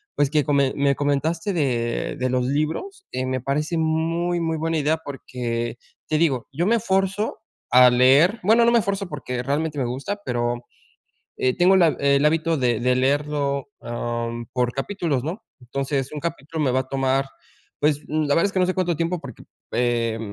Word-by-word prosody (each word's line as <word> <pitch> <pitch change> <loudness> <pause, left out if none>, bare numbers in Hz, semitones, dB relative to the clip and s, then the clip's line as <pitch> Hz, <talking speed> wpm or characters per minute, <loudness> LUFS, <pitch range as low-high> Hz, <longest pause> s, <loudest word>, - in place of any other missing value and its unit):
pues, 145 -2 +2
que 150 -2 +3
com 145 -2 +2 0.2
me 140 -1 +2
comentaste 155 +7 0
de 120 -7 -1
de 130 0 -1
los 125 0 0
libros, 160 - -2
eh, 130 0 -2
me 130 -1 -2
parece 150 +5 -1
muy, 165 +2 0
muy 165 -1 -1
buena 165 +1 -1
idea 155 +1 +1
porque 120 -4 -4 0.3
te 155 - +1
digo, 135 -8 +1
yo 165 +6 0
me 235 - +4
esfuerzo 195 -1 0 0.3
a 125 +1 +8
leer, 140 - +5
bueno, 225 +4 +5
no 235 - +4
me 235 - +5
esfuerzo 200 -2 -2
porque 125 -4 -4
realmente 150 +3 -1
me - - +1
gusta, 140 +12 -4
pero, 120 0 -1 0.8
eh, 130 0 +1
tengo 185 +2 +5
la 175 -3 +5
el 140 +1 +3
hábito 165 +1 +2
de 120 -3 +1
de 125 +1 +2
leerlo, 140 +2 0
am, 120 0 -4
por 125 -1 0
capítulos, 150 -2 -2
¿no?, 180 +8 -4 0.2
entonces 135 +2 -2
un 150 - -5
capítulo 160 -1 -4
me 130 - +2
va 130 - +2
a 130 - -6
tomar, 135 0 +1 0.5
pues, 150 0 +2
la 150 -2 +1
verdad 165 - +3
es 200 - -4
que 190 - +1
no - - +4
sé 185 - +1
cuánto 180 -3 0
tiempo 170 +2 -1
porque, 130 -6 -10 0.3
eh, 115 -2 0
145 Hz, 185 wpm, -23 LUFS, 130-165 Hz, 0.8 s, a